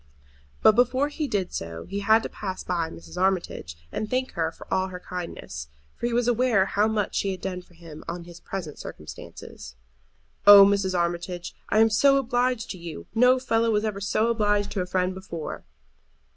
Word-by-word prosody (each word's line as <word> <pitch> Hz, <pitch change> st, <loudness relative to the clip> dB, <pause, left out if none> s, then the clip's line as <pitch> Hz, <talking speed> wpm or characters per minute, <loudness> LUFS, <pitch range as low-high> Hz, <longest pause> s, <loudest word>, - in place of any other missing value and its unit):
But -, -, +9 dB
before 255 Hz, +5 st, +2 dB
he 295 Hz, 0 st, -3 dB
did 195 Hz, -7 st, -2 dB
so 85 Hz, 0 st, -5 dB
he 200 Hz, +2 st, -4 dB
had 220 Hz, +3 st, +4 dB
to -, -, -2 dB
pass 190 Hz, -3 st, -5 dB
by 170 Hz, -3 st, -1 dB
Mrs. 175 Hz, +2 st, -8 dB
Armitage 180 Hz, -, -1 dB
and 215 Hz, -, -3 dB
thank 255 Hz, +1 st, -1 dB
her 165 Hz, -1 st, -1 dB
for -, -, -13 dB
all 190 Hz, 0 st, +1 dB
her 180 Hz, -1 st, -7 dB
kindness; 170 Hz, -, -6 dB, 0.3 s
for 240 Hz, -, -2 dB
he -, -, -2 dB
was 240 Hz, 0 st, +1 dB
aware 240 Hz, -5 st, +3 dB
how 205 Hz, +2 st, +2 dB
much 215 Hz, -2 st, -1 dB
she 200 Hz, -, 0 dB
had 190 Hz, -1 st, -3 dB
done 185 Hz, -1 st, -4 dB
for 175 Hz, -1 st, -23 dB
him 165 Hz, -2 st, -11 dB
in 170 Hz, 0 st, -5 dB
his 170 Hz, 0 st, -12 dB
present 170 Hz, -5 st, -6 dB
circumstances. 75 Hz, -4 st, -10 dB, 0.7 s
"Oh, 200 Hz, -1 st, +11 dB
Mrs. 195 Hz, -2 st, +1 dB
Armitage, 175 Hz, +1 st, -2 dB, 0.2 s
I -, -, +2 dB
am 225 Hz, 0 st, +5 dB
so 275 Hz, +6 st, +5 dB
obliged 245 Hz, -2 st, 0 dB
to 185 Hz, -, -7 dB
you! 170 Hz, -3 st, -8 dB
no 250 Hz, +3 st, +5 dB
fellow 230 Hz, -3 st, +1 dB
was 210 Hz, -1 st, +1 dB
ever 205 Hz, -2 st, -3 dB
so 215 Hz, +3 st, +1 dB
obliged 205 Hz, -2 st, +1 dB
to 195 Hz, -, -1 dB
a 180 Hz, -, -3 dB
friend 180 Hz, 0 st, 0 dB
before." 185 Hz, -4 st, -7 dB
195 Hz, 195 wpm, -25 LUFS, 175-225 Hz, 0.7 s, Oh